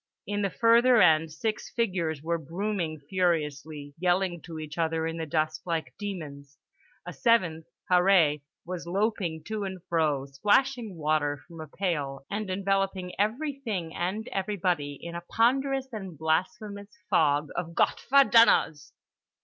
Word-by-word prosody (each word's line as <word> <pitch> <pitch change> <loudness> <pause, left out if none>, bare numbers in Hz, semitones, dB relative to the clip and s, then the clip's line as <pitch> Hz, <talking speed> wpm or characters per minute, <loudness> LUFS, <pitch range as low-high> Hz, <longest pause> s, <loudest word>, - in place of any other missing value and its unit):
In 205 +1 -2
the 200 - +1
further 235 +3 +5
end 160 -3 +5
six 215 +7 -3
figures 175 -10 -1
were 170 +1 -1
brooming 170 0 -3
furiously, 150 -5 -1
yelling 180 -1 +1
to 165 -2 -9
each 155 +1 -7
other 160 0 0
in 165 0 -3
the 160 -1 -4
dust 155 0 -1
like 165 -2 -3
demons. 145 -9 -7 0.5
A - - -6
seventh, 175 -9 +1 0.2
Harree, 180 -5 +4 0.2
was 175 -1 -6
loping 185 -4 -1
to 215 +3 -4
and 190 -1 -5
fro 155 -5 +1
splashing 210 - +1
water 150 -2 0
from 165 -2 -10
a 155 - -7
pail 145 -6 -3
and 205 0 -3
enveloping 195 -1 -1
everything 220 - -2
and 190 +5 -3
everybody 180 -7 -1
in 170 0 -8
a 170 - -5
ponderous 265 +7 +1
and 190 -7 -7
blasphemous 200 +6 -2 0.2
fog 150 -1 +2
of 170 -1 -4
Gott - - +1
ver 275 +1 +7
dummers. 160 - +4
175 Hz, 140 wpm, -28 LUFS, 155-205 Hz, 0.5 s, ver